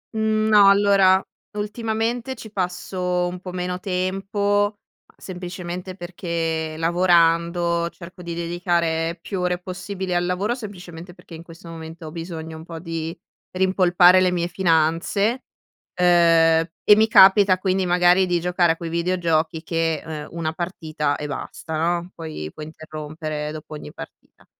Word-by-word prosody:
Mhmm, 220 0 +1
no 205 -2 +7
allora 200 -1 +4 0.3
ultimamente 225 +4 -2
ci 220 -2 -11
passo 180 -1 -2
un 180 +1 -6
po' 185 0 -8
meno 180 0 -3
tempo, 200 +2 -1 0.4
semplicemente 180 0 -7
perché 165 -3 -3
lavorando, 170 0 +2
cerco 180 +1 -12
di 170 -1 -6
dedicare 170 -1 -1
più 190 +2 -5
ore 180 0 0
possibile 185 +1 -5
al 175 0 +1
lavoro, 190 +6 0
semplicemente 180 -7 -9
perché 170 - -16
in 160 - -8
questo 170 +1 -14
momento 165 0 -9
ho 155 - -7
bisogno 165 -1 -7
un 160 - -10
po' 165 -1 -8
di 165 0 -5 0.4
rimpolpare 185 -1 +5
le 180 -1 +3
mie 175 -1 -1
finanze, 180 +7 +1 0.5
ehm, 165 -2 +4 0.2
e 210 - +8
mi 220 +1 +4
capita 195 -2 +6
quindi 185 0 0
magari 180 +1 +4
di 175 -1 +1
giocare 175 -1 +2
a - - -13
quei 165 0 -6
videogiochi 165 -2 0
che, 165 -2 -1
ehm, 155 -2 -6
una 165 -1 -3
partita 160 -4 -3
e 150 - -5
basta 155 +3 -6
no, 175 +2 -1
poi 155 - -7
puoi 155 - -8
interrompere 155 -1 -6
dopo 155 0 -9
ogni 150 - -9
partita. - - -13
175 Hz, 145 wpm, -22 LUFS, 165-185 Hz, 0.5 s, e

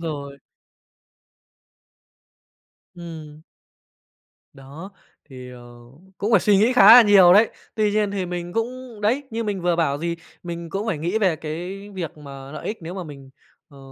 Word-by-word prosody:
rồi. 140 -4 -6 2.6
Ừm. 160 -3 -10 1.1
Đó, 140 +7 -12 0.3
thì, 130 -3 -11
ờ, 125 -1 -12 0.6
cũng 210 +3 -2
phải 205 - +5
suy 205 +1 +3
nghĩ 220 +5 +3
khá 245 -6 +6
là 245 - +9
nhiều 195 -4 +6
đấy. 215 +4 +5 0.2
Tuy 215 -1 +1
nhiên 210 -1 0
thì 190 -3 -3
mình 175 0 -6
cũng 240 0 -5
đấy, 230 +7 0
như 225 0 -3
mình 200 -4 -3
vừa 175 -1 +1
bảo, 145 -4 0
gì, 170 +1 -3 0.3
mình 170 -1 -7
cũng 200 +3 -4
phải 180 -9 -2
nghĩ 175 +7 -1
về 185 -6 +1
cái 180 +6 -7
việc 170 -4 -6
mà 140 -1 -11
lợi 155 - -8
ích 220 - -4
nếu 170 +3 -7
mà 185 - -6
mình, 140 -3 -12 0.4
ờ, 140 -4 -17
175 Hz, 165 wpm, -22 LUFS, 155-205 Hz, 2.6 s, là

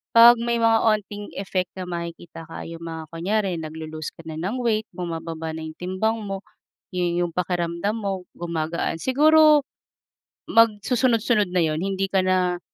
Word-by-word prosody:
'Pag 235 +1 +9
may 235 0 0
mga 225 0 +5
onting 210 -2 0
effect 185 -2 -2
na 185 - -5
makikita 170 -2 -7
kaya 165 0 -8
yung 170 - -8
mga 160 -1 -5
kunyari 185 +1 -1
naglo-loose 155 0 -6
ka 165 - -13
na 160 -1 -6
ng 195 +8 -2
weight, 220 -1 +1
bumababa 165 -2 -4
na 160 - -6
yung 160 0 -7
timbang 185 +6 -1
mo, 195 -1 -4 0.6
yun 175 -1 0
yung 170 - -11
pakiramdam 175 +1 -1
mo 195 -3 -3
gumagaan, 170 -1 -2
siguro, 300 - +5 0.8
mag 230 0 +7 0.2
susunod-sunod 235 -4 +2
na 180 -1 +1
yun, 155 -1 0
hindi 195 +1 -2
ka 195 - +3
na, 185 -1 +1
180 Hz, 160 wpm, -24 LUFS, 165-215 Hz, 0.8 s, Pag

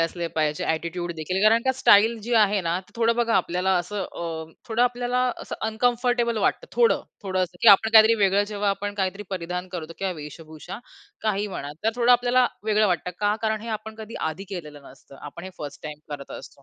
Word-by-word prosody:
असले 170 +1 -1
पाहिजे. 150 -1 0
ॲटिट्यूड 170 +2 -2
देखील, 185 +5 -2
कारण 225 +2 +5
का 260 - +3
स्टाईल 220 +3 +5
जी 240 +3 -4
आहे 210 -2 +4
ना. 170 +1 -1
ते 185 - -24
थोडं 230 0 +2
बघा 235 -1 +1
आपल्याला 180 +2 0
असं 195 +3 -4
अ, 165 -3 -5 0.2
थोडं 230 +1 +1
आपल्याला 245 0 0 0.2
असं - - -6
अनकम्फर्टेबल 240 +1 +1
वाटतं - - 0
थोडं, 475 -1 +3 0.2
थोडं 190 -2 -2
असं 175 0 -4
की 235 - +7
आपण 210 +2 +7
काहीतरी 220 +1 +8
वेगळं 200 +1 +3
जेव्हा 205 0 0
आपण 205 +1 -3
काहीतरी 195 0 -2
परिधान 180 0 -4
करतो 165 -2 -6
किंवा 190 -1 -1
वेशभूषा 155 +5 -9 0.4
काही 210 -1 0
म्हणा. 145 -6 -6
तर 225 - +3
थोडं 245 0 +5
आपल्याला 245 +1 +4 0.2
वेगळं 215 0 +3
वाटतं, 180 -1 -1
का? 205 0 +2
कारण 220 -1 0
हे 230 - -7
आपण 220 +1 -10
कधी 220 +1 -9
आधी 160 +5 -3
केलं 195 -1 -6
केलेलं 150 -2 -13
नसतं. 135 +1 -17
आपण 150 +4 -9
हे 190 - -7
फर्स्ट 145 -1 -8
टाईम 150 -1 -7
करत 140 -1 -7
असतो. 140 - -14
195 Hz, 205 wpm, -24 LUFS, 170-225 Hz, 0.4 s, काहीतरी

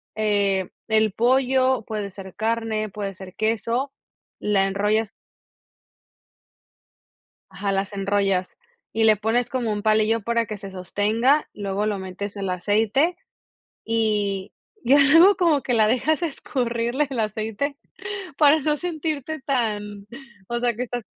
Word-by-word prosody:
Eh, 200 -3 +1 0.2
el 220 -2 +3
pollo 260 +1 +2
puede 210 -2 -4
ser 190 -1 -10
carne, 220 -1 -1
puede 200 -1 -5
ser 185 -1 -11
queso, 230 +5 -1 0.5
la 200 -2 +2
enrollas 210 +2 0 2.4
Ajá, 200 0 -3
las 195 +1 -1
enrollas 195 -2 0 0.4
y 225 - +1
le 215 -1 +6
pones 225 +4 0
como 235 -3 -1
un 205 0 -3
palillo 215 +1 +3
para 235 +2 0
que 210 0 -6
se 195 -1 -8
sostenga, 215 - +1
luego 200 0 -2
lo 210 -2 -1
metes 190 +2 -6
en 200 - -4
el 190 - -1
aceite 215 - +1 0.7
y 210 -4 0 0.4
y 265 - +6
algo 325 +8 +7
como 325 -6 +2
que 250 - -1
la 220 -2 +4
dejas 270 +8 +1
escurrirle 250 -3 -1
el 260 -4 -3
aceite 220 +6 -2 0.6
para 300 0 +6
no 300 +2 +1
sentirte 315 -2 -3
tan, 210 -6 -2 0.4
o 240 0 -1
sea 240 0 +1
que 245 - -2
estás 245 -1 -5
220 Hz, 135 wpm, -23 LUFS, 205-255 Hz, 2.4 s, algo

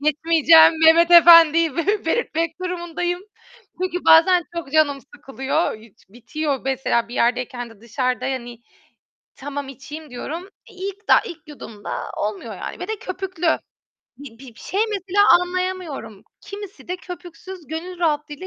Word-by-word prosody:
geçmeyeceğim, 320 +2 +5
Mehmet 335 +2 +6
Efendi'yi 330 -2 +7
be 405 +5 0
belirtmek 330 -4 -2
durumundayım 350 0 -3 0.6
çünkü 360 -1 -3
bazen 350 +2 +6
çok 285 -5 -6
canım 305 -3 +2 0.2
sıkılıyor, 270 +3 -2
iç 215 -2 -20
bitiyor. 270 +6 -4
Mesela 255 -3 -1
bir 240 - -9
yerdeyken 245 0 -1
de 210 - -18
dışarıda, 250 +2 -2
hani, 240 -3 -5 0.8
tamam, 285 0 -6
içeyim 295 +3 -10
diyorum, 305 +8 -6 0.3
eee, 420 - -18
ilk 395 +2 -7
daha - - +6
ilk 345 -8 -11
yudumda 230 -8 -8
olmuyor 210 +1 -4
yani. - - -8
ve 360 - -6
de 440 - -3
köpüklü. 370 -2 -4 0.7
Bir 265 -5 -12
bir 255 -3 -13
bir - - -17
şey 395 - -3
mesela 400 0 +1 0.2
anlayamıyorum. 360 - -5 0.2
Kimisi 400 -2 -10
de 360 - -3
köpüksüz 360 -1 -11
gönül 340 +4 -7
rahatlığıyla 300 0 -2
320 Hz, 140 wpm, -21 LUFS, 265-360 Hz, 0.8 s, Efendi'yi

